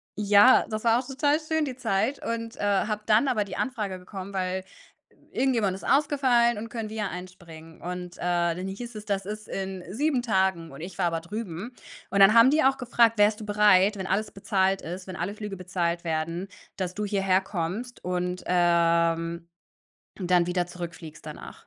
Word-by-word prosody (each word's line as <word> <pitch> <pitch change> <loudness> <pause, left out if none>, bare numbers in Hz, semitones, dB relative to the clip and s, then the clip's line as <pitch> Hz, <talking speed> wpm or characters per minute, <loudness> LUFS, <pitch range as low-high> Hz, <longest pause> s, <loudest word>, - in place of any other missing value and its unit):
ja, 205 +4 +6
das 215 +1 -4
war 230 +1 +4
auch - - -13
total 290 +2 +1
schön 315 0 0
die 260 - -5
Zeit 230 +1 -1
und, 230 0 -3
äh, - - -9
habe 205 +1 +1
dann 220 +6 +4
aber 220 -5 +1
die 195 -2 -8
Anfrage 210 -8 -3
bekommen, 190 +1 -8
weil 185 0 -2 0.7
irgendjemand 235 -8 +1
ist 190 - -10
ausgefallen 265 -5 +3
und 230 +2 -6
können 225 -2 -4
wir 215 -2 -3
einspringen. 170 -3 -11
Und, 180 0 -6
äh, - - -13
dann 175 +1 0
hieß 235 +4 -7
es, 210 - -7
das 195 -2 -2
ist 215 +1 -7
in 190 -1 -4
7 280 0 +1
Tagen 190 - 0
und 135 - -11
ich 175 +2 -8
war 180 -3 +2
aber 165 -1 -1
drüben. 205 +4 -6 0.4
Und 200 - 0
dann 195 +2 +8
haben 235 +4 +7
die 310 -1 +3
auch 270 0 +3
gefragt: 235 -2 +3
„Wärst 210 +1 +3
du - - -6
bereit, 205 -1 +4
wenn 190 -1 -4
alles 210 +3 -1
bezahlt 195 -1 0
ist, 180 +3 -7
wenn 185 - -7
alle 200 +5 -3
Flüge 210 -3 -6
bezahlt 175 -1 -2
werden, 165 +3 -2 0.3
dass 185 -1 -3
du 210 - -3
hierher 195 -2 +2
kommst 195 +7 -4
und, 180 0 -2
ähm, 170 -1 +2 0.7
dann 180 -2 +2
wieder 180 0 0
zurückfliegst 165 -3 -9
danach?“ - - -10
195 Hz, 185 wpm, -26 LUFS, 180-225 Hz, 0.7 s, dann